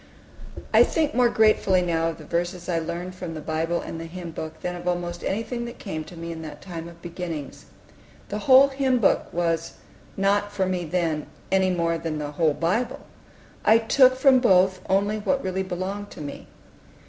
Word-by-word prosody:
I - - +8
think 310 -3 0
more 245 -1 +4
gratefully 215 -5 +3
now 165 -1 +1
of 165 - -6
the 155 - -12
verses 175 +2 -2
I 170 -2 +1
learned 170 +3 -5
from 180 -3 -6
the - - -5
Bible 160 +2 -1
and 165 - -6
the - - -6
Hymn 175 0 -7
Book 160 0 -7
than 180 0 -3
of 175 0 -7
almost 175 -1 -2
anything 235 +4 -2
that 235 +1 -8
came 160 -7 -5
to 170 +2 -12
me 170 0 -6
in 165 -1 -6
that 155 -1 -8
time 170 -3 -7
of 170 0 -14
beginnings. 170 -4 -6 0.6
The 210 - -3
whole 265 +5 +7
Hymn 270 -2 +1
Book 225 - +2
was 165 -1 -1 0.4
not 200 +1 +1
for 195 -2 0
me 180 -2 -2
then, 160 -2 -1 0.2
any 190 -1 +3
more 170 -2 0
than 160 -2 -3
the 145 -1 -4
whole 155 -1 +1
Bible. 200 +9 -1 0.6
I 220 - +6
took 255 +3 +5
from 260 0 +5
both 185 -5 +4
only 200 +3 +2
what 275 +6 0
really 190 0 -1
belonged 190 +2 -4
to - - -10
me. 145 -1 -7
180 Hz, 195 wpm, -25 LUFS, 165-205 Hz, 0.6 s, I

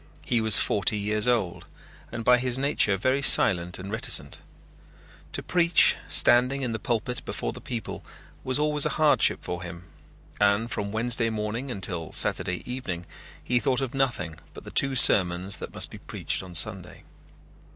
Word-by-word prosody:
He 120 -2 -1
was 110 -1 +8
forty 105 +1 +1
years 105 +2 -1
old, 110 -8 -2 0.5
and 115 -1 -7
by 125 0 +4
his 125 0 -2
nature 135 -7 +1
very 130 +7 -1
silent 90 -9 +4
and 95 +2 -9
reticent. 110 - +1 0.9
To - - -2
preach, 170 -1 +3
standing 125 +3 +3
in 125 - -3
the 110 - -5
pulpit 120 +2 -4
before - - -5
the - - -11
people, 115 -4 -7 0.4
was 130 +1 -2
always 150 -1 +2
a - - -5
hardship 155 -1 +2
for 90 -1 -6
him 85 -1 -10 0.6
and 105 +3 +1
from 100 0 -4
Wednesday 115 +1 0
morning 110 +4 -5
until 90 -7 -5
Saturday 90 0 -1
evening 110 -9 -6 0.4
he 125 0 0
thought 125 +3 -1
of 135 -1 -4
nothing 120 - -3 0.2
but - - -11
the - - -11
two 135 -1 +2
sermons 95 -4 +4
that - - -9
must - - +1
be - - -11
preached - - -4
on 90 -2 -12
Sunday. - - +1
115 Hz, 165 wpm, -25 LUFS, 95-130 Hz, 0.9 s, was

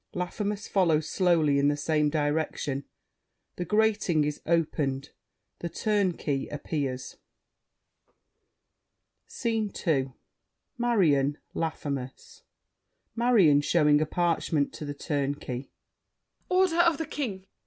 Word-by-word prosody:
Laffemas 200 +3 -3
follows 160 -5 +2
slowly 160 -6 +3
in 140 - +3
the 145 0 +1
same 150 0 +1
direction. 145 -2 -1 0.7
The 180 - -3
grating 210 -6 +2
is 150 0 -3
opened; 150 -4 0 0.5
The 170 - -4
Turnkey 175 -8 0
appears. 140 -3 -4 2.1
SCENE 225 -4 -2
II 135 -6 +1 0.6
Marion, 165 - +2 0.2
Laffemas 155 - -5 0.7
MARION 215 -12 +5
(showing 150 -1 +3
a 155 - 0
parchment 165 -3 0
to 150 - -7
The 145 0 -5
Turnkey). 140 -3 -3 0.8
Order 365 -2 +3
of 335 -3 +4
the 320 - -3
King! 230 -11 -4
160 Hz, 100 wpm, -28 LUFS, 145-205 Hz, 2.1 s, MARION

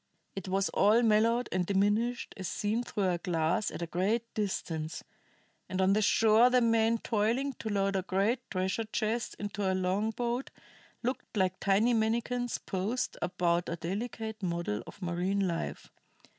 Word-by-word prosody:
It 195 -1 -5
was 195 +1 +1
all 220 +4 +4
mellowed 230 +2 +3
and 185 -1 +1
diminished 205 +6 +1
as 190 -2 -5
seen 210 +5 -1
through 205 -5 -1
a 180 -1 +1
glass 165 +3 0
at 170 -1 -6
great 220 +6 0
distance; 165 -6 -3 0.7
and 185 - -3
on 190 +1 +4
the 215 - +2
shore 220 +3 +5
the 250 0 +4
men 230 -1 +3
toiling 230 +6 0
to 220 - -4
load 195 -1 +1
a 190 - +1
great 195 +6 +1
treasure 190 +4 -1
chest 220 +1 -2
into 205 -1 -2
a - - +1
long 190 +4 0
boat 240 +3 -2 0.5
looked 250 -2 -3
like 185 -1 +1
tiny 205 +5 +3
manikins 235 +2 0
posed 205 +6 -2
about 175 -1 0
a 170 - -2
delicate 220 +5 -4
model 170 - -2
of - - -11
marine 185 +3 0
life. 165 - -4
205 Hz, 155 wpm, -30 LUFS, 185-230 Hz, 0.7 s, shore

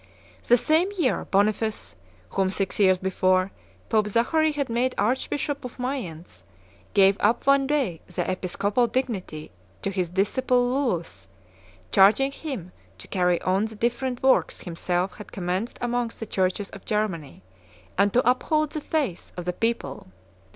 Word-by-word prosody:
The 245 - +6
same 315 - +2
year, 295 -8 +1
Boniface, 210 - 0 0.4
whom, 190 -1 +1
six 195 +1 -2
years 190 -2 +5
before, 185 0 +1 0.4
Pope 215 -1 +2
Zachary 305 +9 +2
had 290 -2 -2
made 245 +2 0
Archbishop 270 +5 -1
of 250 - -8
Mayence, 180 - -5 0.5
gave 195 0 +5
up 220 +3 +2
one 275 0 +4
day 265 - 0
the 175 - -3
episcopal 200 +5 0
dignity 205 - -3 0.3
to 195 - 0
his 185 -3 -1
disciple 245 +7 +1
Lullus, 245 - -1 0.6
charging 220 - +5
him 265 - -6 0.3
to 90 - -11
carry 180 -2 +2
on 190 +3 +2
the 220 0 -7
different 245 +3 -2
works 260 -11 +3
himself 175 +2 -2
had 210 - -10
commenced 185 +5 -3
amongst 240 -1 -2
the 225 - -4
churches 190 0 -1
of 195 - -11
Germany, 180 - -2 0.5
and 200 +1 +3
to 245 +2 +2
uphold 305 +4 +2
the 310 - -4
faith 285 - -2
of 180 - -5
the 180 - -1
people. 225 - -2
210 Hz, 145 wpm, -25 LUFS, 185-255 Hz, 0.6 s, The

